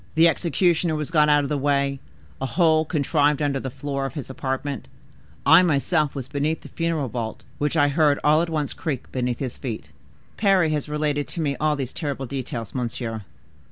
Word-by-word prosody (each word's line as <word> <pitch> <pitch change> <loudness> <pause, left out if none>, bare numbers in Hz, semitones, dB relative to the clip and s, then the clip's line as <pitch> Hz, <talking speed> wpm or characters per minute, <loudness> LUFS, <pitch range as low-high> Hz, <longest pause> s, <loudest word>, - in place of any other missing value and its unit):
The 165 +1 +7
executioner 170 -1 +1
was 150 +1 -3
got 150 -2 +4
out 145 -1 +4
of 140 - -3
the 150 -1 0
way; 140 -1 +1 0.4
a 135 - 0
hole 160 +2 +3
contrived 150 -2 +2
under 145 -2 0
the 130 - -4
floor 140 +1 -3
of 135 - -10
his 140 -3 -5
apartment; 135 -1 -3 0.6
I 170 - +8
myself 155 -2 +1
was 135 -3 -4
beneath 145 +3 -1
the - - -11
funeral 165 -4 -1
vault, 115 -2 -5 0.2
which 150 +3 0
I 145 -1 +5
heard 145 -1 +3
all 155 +2 +5
at 170 - -1
once 150 -3 -1
creak 145 -3 -4
beneath 125 -1 -1
his 130 -3 -4
feet." 120 -6 -5 0.5
"Parry 195 -6 +3
has 150 -1 -2
related 150 -1 -1
to 170 - -3
me 140 -3 0
all 155 0 +2
these 135 -3 -4
terrible 140 -4 -3
details, 125 -4 -5
monsieur." 120 -3 -3
145 Hz, 195 wpm, -24 LUFS, 135-155 Hz, 0.6 s, I